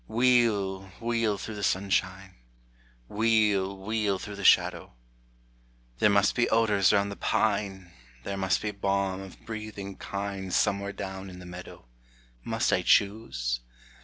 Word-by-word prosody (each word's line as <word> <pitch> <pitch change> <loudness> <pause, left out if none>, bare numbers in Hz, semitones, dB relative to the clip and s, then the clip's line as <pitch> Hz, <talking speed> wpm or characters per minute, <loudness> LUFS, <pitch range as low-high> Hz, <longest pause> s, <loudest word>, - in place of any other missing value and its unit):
Wheel, 110 -5 +2
wheel 115 -3 0
through 110 - -6
the 105 - -6
sunshine, 95 0 0 0.7
Wheel, 105 -3 +2
wheel 105 0 -1
through 100 +1 -8
the 100 - -6
shadow; - - +3 1.1
There - - +5
must 100 0 +3
be 120 - +1
odors 105 -4 +3
round 100 0 +2
the - - -6
pine, 100 -5 -1 0.3
There 100 - -4
must 95 0 0
be 105 - -1
balm 100 -1 -1
of 95 -1 -12
breathing 105 -3 -6
kine, 100 -1 -5
Somewhere 100 +2 +1
down 95 -1 -6
in 90 - -10
the 90 - -11
meadow. 90 -6 -10 0.6
Must - - 0
I - - +2
choose? 65 - +1
100 Hz, 135 wpm, -28 LUFS, 95-105 Hz, 1.1 s, There